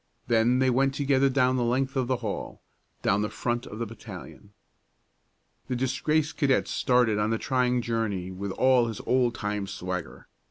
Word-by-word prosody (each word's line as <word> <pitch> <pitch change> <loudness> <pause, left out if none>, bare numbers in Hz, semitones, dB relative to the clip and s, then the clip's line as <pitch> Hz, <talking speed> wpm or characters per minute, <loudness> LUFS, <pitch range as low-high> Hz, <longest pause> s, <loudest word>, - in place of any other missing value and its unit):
Then 120 +1 +3
they 130 0 +3
went 135 +2 +2
together 140 -1 +2
down 130 -1 +2
the 125 - +1
length 130 +3 0
of 130 -2 0
the 130 - +1
hall, 100 - -5 0.4
down 100 +1 +2
the 105 - -1
front 120 +3 -2
of 105 - -8
the 115 - -2
battalion. 105 -1 -11 1.2
The 125 - -2
disgraced 150 +5 0
cadet 135 -4 +2
started 125 -4 +2
on 105 +1 +1
the 115 - +1
trying 125 -1 +1
journey 105 -6 -2
with 100 +2 -5
all 130 +2 +4
of - - -3
his 110 -3 -5
old 125 -2 +2
time 105 -2 -3
swagger. 90 -2 -5
120 Hz, 175 wpm, -27 LUFS, 105-130 Hz, 1.2 s, all